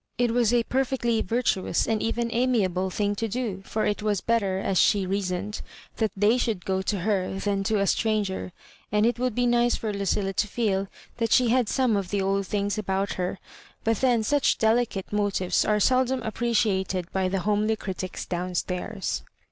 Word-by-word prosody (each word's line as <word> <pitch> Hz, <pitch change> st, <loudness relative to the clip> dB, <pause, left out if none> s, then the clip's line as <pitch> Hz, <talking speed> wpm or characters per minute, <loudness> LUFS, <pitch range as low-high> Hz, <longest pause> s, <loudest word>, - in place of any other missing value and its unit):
It 240 Hz, -1 st, +2 dB
was 235 Hz, -2 st, +2 dB
a 240 Hz, -1 st, +3 dB
perfectly 245 Hz, -3 st, 0 dB
vurtuous 225 Hz, -2 st, 0 dB
and 220 Hz, -1 st, 0 dB
even 235 Hz, +1 st, -1 dB
amiable 205 Hz, -7 st, +1 dB
thing 205 Hz, +2 st, 0 dB
to 225 Hz, -, -1 dB
do, 220 Hz, -4 st, -3 dB
for 215 Hz, -, -1 dB
it 210 Hz, 0 st, -1 dB
was 210 Hz, -2 st, 0 dB
better, 200 Hz, -4 st, 0 dB
as 190 Hz, -1 st, 0 dB
she 200 Hz, -2 st, +3 dB
rea 195 Hz, +2 st, 0 dB
soned, 190 Hz, +3 st, -3 dB, 0.4 s
that 220 Hz, -2 st, +1 dB
they 215 Hz, +5 st, +3 dB
should 215 Hz, -7 st, -1 dB
go 190 Hz, 0 st, 0 dB
to 190 Hz, 0 st, -2 dB
her 190 Hz, -1 st, 0 dB
than 200 Hz, 0 st, -1 dB
to 220 Hz, 0 st, +1 dB
a 200 Hz, -, +2 dB
stran 215 Hz, +1 st, +1 dB
ger, 190 Hz, -1 st, -5 dB, 0.4 s
and 210 Hz, +1 st, +3 dB
it 240 Hz, +1 st, +1 dB
would 250 Hz, -3 st, -1 dB
be 245 Hz, -, +2 dB
nice 240 Hz, 0 st, +3 dB
for 215 Hz, -2 st, -3 dB
Lucilla 195 Hz, 0 st, -1 dB
to 210 Hz, -, 0 dB
feel 200 Hz, -3 st, 0 dB, 0.3 s
that 230 Hz, -1 st, -1 dB
she 250 Hz, -2 st, +5 dB
had 245 Hz, -2 st, +2 dB
some 255 Hz, -5 st, +2 dB
of 195 Hz, -3 st, -2 dB
the 205 Hz, -, 0 dB
old 195 Hz, 0 st, 0 dB
things 205 Hz, +1 st, -1 dB
about 195 Hz, -1 st, -1 dB
her; 180 Hz, +1 st, -3 dB, 0.5 s
but 225 Hz, -1 st, +1 dB
then 245 Hz, -2 st, +2 dB
such 285 Hz, +5 st, +2 dB
delicate 220 Hz, -3 st, 0 dB
motives 200 Hz, -3 st, +1 dB
are 210 Hz, 0 st, +2 dB
seldom 255 Hz, +3 st, +2 dB
appreciat 220 Hz, -4 st, 0 dB
ed 180 Hz, -1 st, -4 dB
by 190 Hz, -1 st, 0 dB
the 190 Hz, 0 st, -1 dB
homely 210 Hz, +2 st, +1 dB
critics 185 Hz, -3 st, -5 dB
down 180 Hz, 0 st, -3 dB
stairs. 190 Hz, +3 st, -2 dB
210 Hz, 195 wpm, -26 LUFS, 195-230 Hz, 0.5 s, she